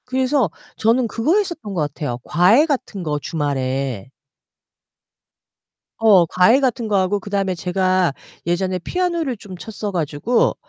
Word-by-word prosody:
그래서 260 Hz, -, +1 dB, 0.3 s
저는 230 Hz, +2 st, +2 dB
그거 240 Hz, -, +1 dB
했었던 340 Hz, -, -3 dB
것 175 Hz, -, -1 dB
같아요 145 Hz, -4 st, -3 dB
과외 190 Hz, -, +4 dB
같은 255 Hz, -, -3 dB
거 150 Hz, -2 st, -2 dB
주말에. 135 Hz, -6 st, -2 dB, 1.9 s
어 205 Hz, -6 st, +5 dB
과외 180 Hz, +10 st, +4 dB
같은 250 Hz, -4 st, 0 dB
거 205 Hz, -2 st, +1 dB
하고 190 Hz, +2 st, +1 dB
그 200 Hz, -, -10 dB
다음에 195 Hz, -2 st, 0 dB
제가 185 Hz, -1 st, +1 dB, 0.3 s
예전에 185 Hz, +1 st, 0 dB
피아노를 335 Hz, -, -2 dB
좀 195 Hz, -2 st, -10 dB
쳤어 210 Hz, +1 st, -6 dB
가지고 170 Hz, -, 0 dB
195 Hz, 275 characters per minute, -20 LUFS, 170-245 Hz, 1.9 s, 어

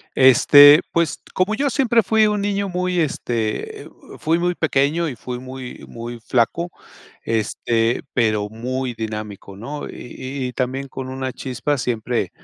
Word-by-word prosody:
Este, 145 Hz, +3 st, +8 dB
pues, 170 Hz, -3 st, 0 dB
como 190 Hz, +4 st, +1 dB
yo 275 Hz, +3 st, 0 dB
siempre 235 Hz, -4 st, +3 dB
fui 220 Hz, 0 st, +3 dB
un 210 Hz, -1 st, 0 dB
niño 200 Hz, -1 st, -1 dB
muy, 180 Hz, -1 st, -1 dB
este, 115 Hz, -7 st, -2 dB
eh, -, -, -12 dB, 0.3 s
fui 165 Hz, +2 st, +1 dB
muy 175 Hz, +1 st, 0 dB
pequeño 155 Hz, +2 st, +1 dB
y 125 Hz, -, -6 dB
fui 125 Hz, -1 st, -6 dB
muy 130 Hz, 0 st, -9 dB
muy 120 Hz, 0 st, -7 dB
flaco, 130 Hz, +10 st, 0 dB, 0.5 s
este, 115 Hz, +1 st, 0 dB
pero 110 Hz, -4 st, +1 dB
muy 125 Hz, +3 st, -3 dB
dinámico 105 Hz, -3 st, -6 dB
¿no? 140 Hz, +8 st, -6 dB
Y 130 Hz, +1 st, -6 dB
y -, -, -7 dB
también 130 Hz, +2 st, -3 dB
con 130 Hz, 0 st, -6 dB
una 130 Hz, -1 st, -4 dB
chispa, 130 Hz, +2 st, -2 dB
siempre 120 Hz, 0 st, -1 dB
130 Hz, 150 wpm, -21 LUFS, 120-170 Hz, 0.5 s, Este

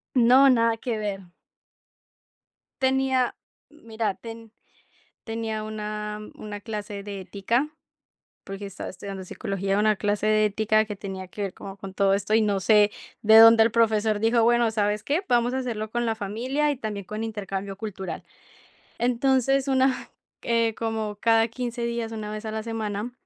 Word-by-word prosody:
No, 255 Hz, +3 st, +6 dB
nada 230 Hz, -2 st, +3 dB
que 230 Hz, -1 st, -3 dB
ver. 200 Hz, -3 st, -4 dB, 1.6 s
Tenía 265 Hz, -1 st, +2 dB, 0.3 s
mira, 225 Hz, -8 st, -4 dB
ten 225 Hz, +1 st, -10 dB, 0.7 s
tenía 225 Hz, -1 st, -3 dB
una 210 Hz, 0 st, -5 dB
una 205 Hz, -1 st, -7 dB
clase 210 Hz, -2 st, -6 dB
de 200 Hz, -1 st, -6 dB
ética 210 Hz, +10 st, -1 dB, 0.7 s
porque 195 Hz, +1 st, -7 dB
estaba 195 Hz, -1 st, -7 dB
estudiando 190 Hz, 0 st, -7 dB
psicología. 195 Hz, +1 st, -2 dB
Una 215 Hz, 0 st, +3 dB
clase 205 Hz, +1 st, -1 dB
de 215 Hz, 0 st, +4 dB
ética 215 Hz, +1 st, +2 dB
que 210 Hz, -1 st, -6 dB
tenía 190 Hz, -2 st, -7 dB
que 205 Hz, -, -6 dB
ver 195 Hz, -2 st, -3 dB
como 195 Hz, 0 st, -9 dB
con 195 Hz, -1 st, -9 dB
todo 195 Hz, 0 st, +3 dB
esto, 205 Hz, +2 st, -1 dB
y 225 Hz, -, +5 dB
no 200 Hz, -2 st, +1 dB
sé 210 Hz, +1 st, +5 dB, 0.3 s
de 220 Hz, +1 st, +7 dB
dónde 225 Hz, 0 st, +9 dB
el 225 Hz, -, +3 dB
profesor 220 Hz, -2 st, +2 dB
dijo, 225 Hz, +1 st, +3 dB
bueno, 235 Hz, 0 st, +3 dB
¿sabes 210 Hz, -1 st, 0 dB
qué?, 310 Hz, +7 st, 0 dB
vamos 240 Hz, +1 st, +2 dB
a 265 Hz, -, 0 dB
hacerlo 220 Hz, -4 st, -3 dB
con 240 Hz, +1 st, -1 dB
la 225 Hz, -, +1 dB
familia 245 Hz, +9 st, -1 dB
y 285 Hz, -, -1 dB
también 210 Hz, -5 st, -5 dB
con 215 Hz, +2 st, -4 dB
intercambio 195 Hz, -3 st, -5 dB
cultural. 190 Hz, -4 st, -6 dB, 0.8 s
Entonces, 265 Hz, +3 st, +2 dB
una 265 Hz, -1 st, +1 dB, 0.3 s
eh, 230 Hz, -1 st, +1 dB
como 220 Hz, -2 st, -3 dB
cada 225 Hz, +1 st, +3 dB
15, 240 Hz, 0 st, -4 dB
días, 235 Hz, -1 st, -3 dB
una 215 Hz, -1 st, -5 dB
vez 215 Hz, +1 st, -6 dB
a 215 Hz, -, -4 dB
la 220 Hz, -, -3 dB
semana, 220 Hz, 0 st, -4 dB
220 Hz, 165 wpm, -25 LUFS, 205-235 Hz, 1.6 s, dónde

